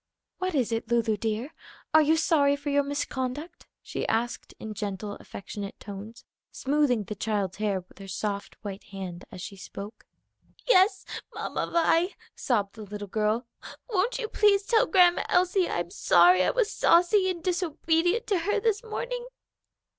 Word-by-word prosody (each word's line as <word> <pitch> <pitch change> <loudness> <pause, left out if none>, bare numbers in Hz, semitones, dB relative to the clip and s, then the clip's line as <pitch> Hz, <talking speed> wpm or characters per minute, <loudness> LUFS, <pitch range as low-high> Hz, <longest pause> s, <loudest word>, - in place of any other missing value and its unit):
"What 370 -2 -1
is 245 -5 +1
it, 225 0 -2
Lulu, 230 -2 +2
dear? 225 +7 -3 0.4
are 315 - +8
you 310 +2 +3
sorry 290 -4 +3
for 285 0 -4
your 285 0 +4
misconduct?" 285 +3 -4 0.2
she - - -4
asked 235 +2 -1
in 220 -1 -6
gentle, 205 0 -4
affectionate 200 0 -8
tones, 205 +3 -9 0.3
smoothing 270 -5 +1
the 210 - -5
child's 200 -3 -2
hair 205 -3 0
with 180 - -22
her 195 - -9
soft 200 +1 -4
white 200 -1 -6
hand 185 -3 -7
as 185 - -8
she 200 - -7
spoke. 200 +2 -9 0.6
"Yes, 385 -4 +4 0.3
Mamma - - -3
Vi," 340 +2 +2 0.2
sobbed 205 -6 0
the 220 - -10
little 205 0 -7
girl. 215 +4 0 0.4
"Won't 435 +3 +1
you 450 - -3
please 415 -2 +3
tell 450 0 +3
Grandma 360 -3 +5
Elsie 365 0 +3
I'm 175 0 -2
sorry 180 +1 +5
I - - +3
was 475 -4 +1
saucy 375 +3 +4
and 345 -3 -4
disobedient 350 +2 +1
to 395 -4 +1
her 410 +5 0
this 440 +1 0
morning?" 485 +2 -4
265 Hz, 160 wpm, -27 LUFS, -, 0.6 s, are